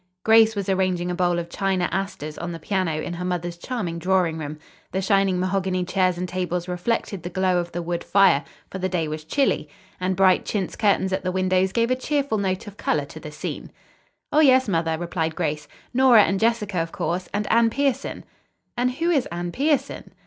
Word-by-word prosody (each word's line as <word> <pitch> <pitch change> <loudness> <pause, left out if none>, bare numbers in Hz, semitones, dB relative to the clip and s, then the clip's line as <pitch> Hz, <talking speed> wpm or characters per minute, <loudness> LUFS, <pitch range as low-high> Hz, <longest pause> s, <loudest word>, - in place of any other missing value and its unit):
Grace 220 0 +6
was 200 -2 -3
arranging 185 -2 0
a - - -1
bowl 175 -1 +1
of 170 -1 -3
China 190 0 0
asters 190 -6 -3
on 175 0 -4
the 165 - -5
piano 185 0 -1
in 170 - -4
her 175 +1 -5
mother's 175 -1 -2
charming 175 -3 -4
drawing 180 -2 +1
room. 150 0 -5 0.3
The 190 - -1
shining 195 -1 +2
mahogany 185 -1 0
chairs 185 -1 +1
and 180 +1 -3
tables 180 -1 -2
reflected 180 +1 -2
the 175 - -5
glow 185 0 +1
of 175 0 -4
the 175 0 -4
wood 170 0 -3
fire, 195 -7 +4 0.3
for 190 - -5
the 185 0 -1
day 170 -3 -1
was 155 0 -5
chilly, 260 - 0 0.3
and 185 +1 0
bright 190 0 +4
chintz 195 -4 -3
curtains 190 -2 +2
at 190 - -1
the 185 - -1
windows 185 0 +1
gave 230 +3 +1
a - - +4
cheerful 275 -3 -1
note 190 0 -1
of 205 -1 -11
color - - 0
to - - -11
the - - -8
scene. - - -6 0.6
"Oh, 300 - +5
yes, 260 -4 +5
mother," 165 -4 0
replied 165 -1 -2
Grace. 150 -3 -2 0.3
"Nora 245 -4 +7
and 195 -1 0
Jessica, 215 -4 +1
of 165 0 -2
course, 180 +1 -3
and 205 +1 -1
Anne 230 0 +5
Pierson." 275 +1 -1 0.5
"And 250 +1 0
who 335 +6 0
is 285 -7 +2
Anne 175 +1 -4
Pierson?" 290 - -1
185 Hz, 205 wpm, -23 LUFS, 175-210 Hz, 0.6 s, Nora